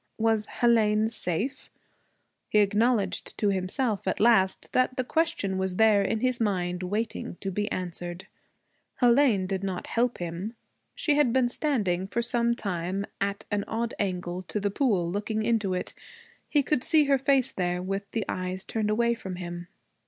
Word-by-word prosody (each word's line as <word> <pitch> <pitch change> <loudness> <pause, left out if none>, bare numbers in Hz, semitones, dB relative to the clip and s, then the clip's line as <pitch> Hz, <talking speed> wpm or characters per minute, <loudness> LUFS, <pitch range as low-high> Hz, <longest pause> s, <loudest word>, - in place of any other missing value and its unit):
Was 220 -1 +1
Hélène 220 -2 +2
'safe'? 225 - -2 0.8
He - - +2
acknowledged 210 0 +1
to 205 - +2
himself 195 +3 -1
at - - 0
last 200 -4 +3
that 255 +1 +1
the 255 - +1
question 250 - 0
was 190 -1 -1
there 215 -1 +5
in 215 +3 -1
his 255 -1 +1
mind, 180 -4 0
waiting 205 +2 -3
to 195 - -3
be 210 +3 -2
answered. 175 0 -5 0.7
Hélène 240 -5 +4
did 190 0 -2
not 190 -2 -3
help 245 +1 0
him. 175 +6 -5 0.4
She 300 - +1
had 290 -5 +4
been 255 0 +3
standing 210 - 0
for 235 +4 -1
some 235 0 +1
time 190 -1 -3 0.2
at 200 +2 -2
an 205 -1 0
odd 230 +1 -2
angle 180 -2 -2
to 210 - -2
the 205 0 -1
pool, 200 -8 +1
looking 210 +4 -2
into 215 -5 +1
it. 180 - -4 0.6
He 290 -2 +3
could 265 -1 0
see 315 -2 +5
her 275 -1 +3
face 265 -1 +2
there, 180 -1 -1
with 195 +2 -4
the 225 -3 -2
eyes 185 +1 -3
turned 215 -2 -1
away 235 +2 +2
from 190 -6 -6
him. 175 -1 -6
210 Hz, 165 wpm, -27 LUFS, 185-235 Hz, 0.8 s, there